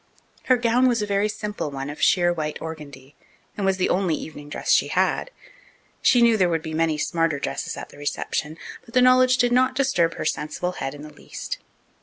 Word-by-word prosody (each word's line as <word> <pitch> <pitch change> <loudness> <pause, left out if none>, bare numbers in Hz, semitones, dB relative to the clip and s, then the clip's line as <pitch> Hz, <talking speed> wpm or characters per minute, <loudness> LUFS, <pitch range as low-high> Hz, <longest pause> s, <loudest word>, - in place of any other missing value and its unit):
Her 255 - +4
gown 245 +2 +3
was 235 -4 +1
a - - 0
very 200 +1 +1
simple 210 -6 -4
one 135 -1 -5
of 145 +1 -7
sheer 175 -1 +4
white 155 -2 -3
organdie, 145 -4 -9 0.4
and 200 -2 -1
was 190 -1 +2
the 185 - +1
only 180 -4 +1
evening 145 -2 -9
dress - - -2
she - - +4
had. - - 0 0.7
She 245 -2 +5
knew 230 -2 +5
there 185 -3 +3
would 165 -2 -1
be 160 -1 -6
many 160 -1 +1
smarter 165 0 0
dresses 140 - -4
at - - -7
the - - -15
reception, 150 +1 -3 0.3
but 230 - -15
the 250 - +6
knowledge 255 0 +5
did 245 -1 +2
not 255 +1 +3
disturb 255 -12 +1
her - - -5
sensible 150 +4 -2
head 135 -5 -5
in 145 - -10
the 150 0 -11
least. - - -7
175 Hz, 210 wpm, -23 LUFS, 150-235 Hz, 0.7 s, the